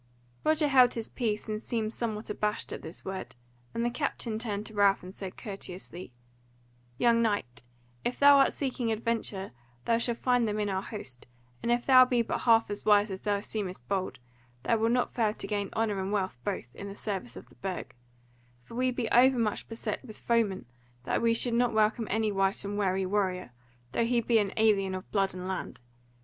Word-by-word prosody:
Roger 310 0 +3
held 255 -3 +5
his 230 -1 -3
peace 215 -3 -2
and 215 0 -3
seemed 225 -2 -2
somewhat 220 -2 -3
abashed 210 0 -2
at - - -6
this 160 +3 -9
word, 190 -6 -5 0.4
and 230 - -1
the - - +2
captain 235 -4 -2
turned 210 -3 -3
to 220 - -8
Ralph 200 -2 +3
and 185 +1 -9
said 195 -2 -7
courteously: 185 - -6 0.9
"Young 235 -1 +4
knight, 205 - -1 0.4
if 245 - -1
thou 285 0 +8
art 270 - +5
seeking 255 -4 -2
adventures, 220 -3 -2 0.3
thou 230 0 +3
shalt 235 0 0
find 245 -2 +2
them 210 0 -1
in 205 -1 0
our 190 -1 -1
host; 195 - -8 0.3
and 235 - 0
if 240 0 +1
thou 255 -1 +8
be 245 -2 +2
but - - -2
half 225 -2 +4
as 205 - -5
wise 210 0 +4
as 190 - -5
thou 205 -1 0
seemest 200 -4 -4
bold, 195 -2 -1 0.5
thou 230 - +2
wilt 225 +1 +2
not 250 0 +1
fail 220 -3 +1
to - - -5
gain 205 -2 -2
honour 215 -3 0
and 190 +1 -3
wealth 190 -10 -1
both, 120 0 -4
in 200 - -7
the 200 - -7
service 190 - -4
of - - -10
the 125 - -20
Burg; 190 -2 -4 0.7
for 125 - -14
we 255 +2 +1
be 245 -2 -2
overmuch 245 -3 +3
beset 225 +4 -4
with 220 -5 -11
foemen 225 -5 0 0.4
that - - 0
we 230 0 +3
should 235 +1 0
not 240 0 +2
welcome 220 +1 +2
any 220 +1 +1
wight 195 0 +1
and 200 +1 -3
wary 190 -2 +1
warrior, 185 -5 -1 0.4
though 230 - +1
he 240 +1 +2
be 230 -1 +3
an 200 -2 0
alien 200 -4 +3
of 185 - -8
blood 195 -2 +1
and 180 0 -5
land. 190 -1 -4
215 Hz, 200 wpm, -29 LUFS, 195-235 Hz, 0.9 s, thou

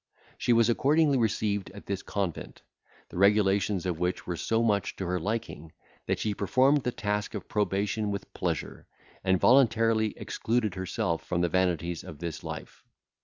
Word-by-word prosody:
She - - +1
was 115 -1 +5
accordingly 140 +3 +3
received 105 -3 0
in 100 +1 -11
this 100 -1 -3
convent, 95 -5 -4 0.5
the - - -6
regulations 100 -1 +3
of 90 -3 -2
which 90 +1 -1
were 90 - -3
so 115 +6 0
much 105 -3 +1
to 95 - -4
her 90 +1 -1
liking, 100 -5 -4 0.3
that - - +1
she 105 - -1
performed 130 +8 +3
the 125 - -1
task 105 0 -2
of 105 - -6
probation 105 0 0
with 100 -1 -5
pleasure, - - -3 0.4
and 95 -1 +2
voluntarily 115 -4 +4
excluded 110 -3 -1
herself 90 -3 -2
from 85 -1 -1
the 85 - +2
vanities 85 -2 0
of 75 - -9
this 85 -1 -5
life. - - -8
100 Hz, 165 wpm, -28 LUFS, 90-115 Hz, 0.5 s, was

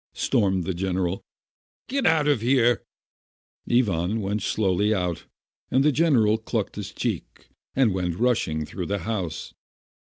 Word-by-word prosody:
stormed 95 -7 +1
the 95 - -2
general. 90 0 -1 0.6
"Get 270 +2 0
out 160 -2 +3
of 145 -7 +2
here 120 -1 +3 0.4
!" - - -15
Ivan 105 -4 +2
went 105 +1 -2
slowly 105 +1 +1
out, 90 -3 -2 0.4
and 135 +2 +3
the 150 - +5
general 125 -8 +3
clutched 110 - -3
his - - -6
cheek, - - -4 0.3
and 125 -7 +3
went 90 -2 -2
rushing 105 -11 +1
through - - -5
the 100 - -1
house. 95 -8 -3
105 Hz, 145 wpm, -25 LUFS, 95-125 Hz, 0.6 s, the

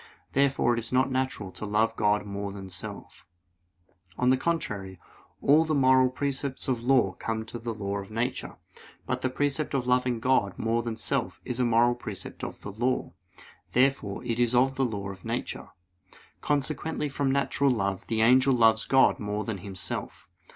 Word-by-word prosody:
Therefore 135 -3 +2
it 120 - 0
is 115 0 -7
not 130 +1 +2
natural 130 -7 -2
to - - -8
love 105 +2 +1
God 105 -1 +1
more 100 0 -4
than 95 -1 -8
self. 90 -1 -5 0.9
On 125 - +2
the 130 - +6
contrary, 105 - -3 0.4
All 150 +3 +6
the 155 -1 0
moral 130 -1 +5
precepts 140 +1 -3
of 130 -2 +1
the 120 - -8
law 120 -8 +4
come 110 0 -2
of 120 -2 -6
the 120 - -2
law 100 -1 -3
of 100 - -8
nature. 115 +3 -3 0.5
But - - -2
the 130 - 0
precept 145 +2 -1
of 130 -2 0
loving 125 -1 +1
God 110 -6 +1
more 115 +1 0
than 115 -1 -4
self - - -2
is 125 0 -3
a 125 - +3
moral 120 +1 +4
precept 110 -5 -7
of - - -6
the 100 - -6
law. 120 +5 -1 0.6
Therefore, 125 -6 +1
it 115 0 -1
is 120 0 +3
of 130 +2 +4
the 135 0 +1
law 100 -4 -4
of 95 -1 -12
nature. - - -4 0.7
Consequently 150 +2 -1
from 140 -1 -1
natural 140 +1 +1
love 100 -6 -1
the 110 -1 0
angel 130 +3 +5
loves 110 -2 +4
God 135 0 +4
more 105 0 -2
than 110 -3 -4
himself. 95 -1 -5
120 Hz, 180 wpm, -27 LUFS, 105-130 Hz, 0.9 s, the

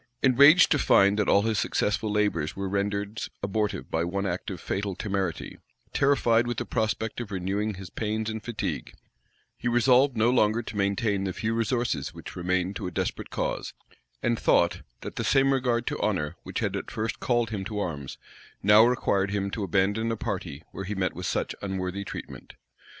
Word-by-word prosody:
Enraged 140 +6 +7
to 145 - +4
find 100 -2 +4
that 105 - +1
all 100 - +5
his 110 -2 +1
successful 105 +1 0
labors 105 -8 0
were 100 0 -3
rendered 100 +2 -2 0.2
abortive 105 +1 -2
by 80 - +1
one 100 +3 -2
act 90 -1 -3
of 95 -4 -5
fatal 100 +2 -3
temerity, 95 -4 -3 0.3
terrified 120 -4 +3
with 120 -1 -2
the - - -2
prospect 110 0 -1
of 115 - -6
renewing 100 +2 -2
his 95 -1 -9
pains 110 0 -2
and 110 -1 -4
fatigue, 105 - -4 0.6
he - - -4
resolved 125 +2 +4
no 115 +2 +4
longer 115 -1 +2
to 110 - -8
maintain 100 0 0
the 95 -1 -2
few 115 +4 -2
resources 115 - -1
which - - -9
remained 90 +2 -1
to - - -4
a - - -5
desperate - - -3
cause, - - -3 0.5
and 120 -1 +1
thought, 85 0 +3 0.2
that - - -7
the - - -1
same 135 0 +4
regard 120 -3 +1
to - - -3
honor 90 -9 0
which - - -4
had - - -1
at - - -4
first 110 +1 -3
called 120 -2 +1
him 100 -3 -3
to 105 +2 -5
arms, 75 -9 -4 0.5
now 105 +2 +7
required 100 -5 +2
him 100 -1 -2
to 105 - -3
abandon 100 +5 +1
a 115 - -2
party 70 -5 -4
where 95 - -6
he 105 +2 -3
met 95 -1 0
with 90 0 -5
such - - -1
unworthy 95 0 -3
treatment. - - -8
105 Hz, 190 wpm, -27 LUFS, 95-115 Hz, 0.6 s, Enraged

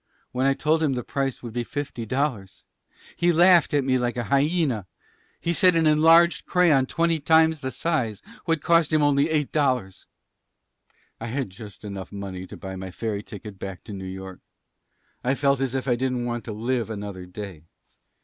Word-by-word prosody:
When 130 +2 +1
I 135 - +3
told 155 +3 +1
him 150 -4 +2
the 125 -1 -3
price 135 -3 -3
would 115 -2 -7
be 120 0 -1
fifty 135 -3 -5
dollars 125 -7 -2 0.5
he 175 0 +2
laughed 175 -1 +5
at 145 -2 +2
me 130 -1 +2
like 120 0 -1
a 120 - -1
hyena. 140 - +1 0.5
He 170 - -1
said 180 0 +5
an 165 -1 +3
enlarged 165 +3 +5
crayon 160 -8 +3
twenty 165 +1 +1
times 160 +1 +4
the 130 - -3
size 130 - -2 0.2
would 165 -3 0
cost 165 -2 +3
him 155 -1 +3
only 145 +1 +3
eight 150 -3 0
dollars. 130 -10 -1 1.1
"I 115 - -5
had 125 -3 -3
just 105 0 -11
enough 100 -2 -7
money 95 -2 -6
to - - -10
buy 95 -1 -7
my 95 0 -6
ferry 105 +2 -3
ticket 105 -1 -10
back 95 -2 -7
to 105 - -9
New 95 -1 -6
York. 95 0 -8 0.8
I 130 +2 +1
felt 140 -1 +2
as 135 -1 -1
if 130 0 -2
I 125 - +3
didn't 125 0 -1
want 120 -1 -3
to 115 - -5
live 115 +2 -2
another 100 -4 -6
day. 95 -3 -8
130 Hz, 190 wpm, -24 LUFS, 105-155 Hz, 1.1 s, laughed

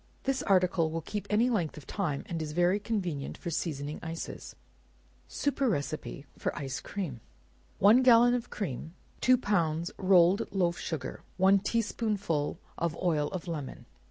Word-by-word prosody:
This 270 -1 0
article 180 -4 +3
will 165 0 -4
keep 205 +5 -5
any 220 +4 +3
length 175 -10 -1
of 150 - -10
time, 160 -9 -2
and 165 -2 -4
is 150 -1 -4
very 175 +4 +3
convenient 180 -10 -3
for 170 - -5
seasoning 150 -2 -3
ices. 165 +1 -6 0.7
Superior 275 -4 0
Receipt 145 0 -4
for - - -2
Ice 135 -2 -4
Cream. 170 -12 -5 0.6
One 215 +6 +6
gallon 245 -1 +6
of 245 -1 -2
cream, 165 - -5 0.3
two 255 0 +5
pounds 170 -7 0
rolled 185 +1 +4
loaf 175 -3 +1
sugar, 160 -6 -4 0.2
one 195 +1 +5
tea 230 +4 0
spoonful 205 -10 -1 0.2
of 170 -1 -1
oil 155 -5 +1
of 185 0 -6
lemon. 150 -6 -5
175 Hz, 155 wpm, -30 LUFS, 155-205 Hz, 0.7 s, One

